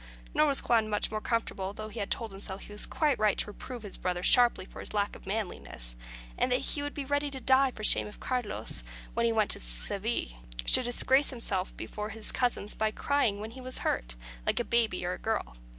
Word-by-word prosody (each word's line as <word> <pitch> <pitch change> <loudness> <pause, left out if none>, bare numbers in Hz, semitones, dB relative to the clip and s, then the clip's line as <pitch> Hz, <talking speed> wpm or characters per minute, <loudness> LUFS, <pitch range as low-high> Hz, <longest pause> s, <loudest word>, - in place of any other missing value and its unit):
Nor 305 - +4
was 280 -2 +1
Juan 225 -2 +3
much 210 0 +1
more 215 0 -3
comfortable, 200 -5 -2
though 215 +1 -7
he 215 0 -4
told 225 -3 -2
himself 195 0 -5
he - - -10
was 210 - -2
quite 300 -4 +1
right 215 -2 +2
to - - +1
reprove 230 +3 -9
his 205 - -6
brother 180 -1 -2
sharply 240 -5 +7
for - - -12
his - - -8
lack 205 0 0
of - - -14
manliness; 190 - -5 0.5
and 255 - +1
that 250 - +4
he 290 - -1
would 290 0 -5
be 285 - -4
ready 285 +1 0
to 270 -1 -4
die 265 +1 +4
for 215 -4 -10
shame - - +7
if 210 - -12
Carlos, 250 -5 -2 0.3
when 235 0 +1
he - - +2
went 215 -2 +1
to - - +1
Seville, - - -3 0.3
should 255 - +8
disgrace 265 +3 +3
himself 200 -7 -3
before 210 0 -5
his 220 0 +2
cousins 240 -4 -1
by 220 0 0
crying 225 -3 0
when 215 +2 -6
he 260 +2 -10
was 255 0 -3
hurt, - - -1 0.3
like - - +1
a - - +1
baby 225 -7 +1
or 180 - -1
a - - -7
girl. 220 - -2
220 Hz, 225 wpm, -29 LUFS, 200-250 Hz, 0.5 s, should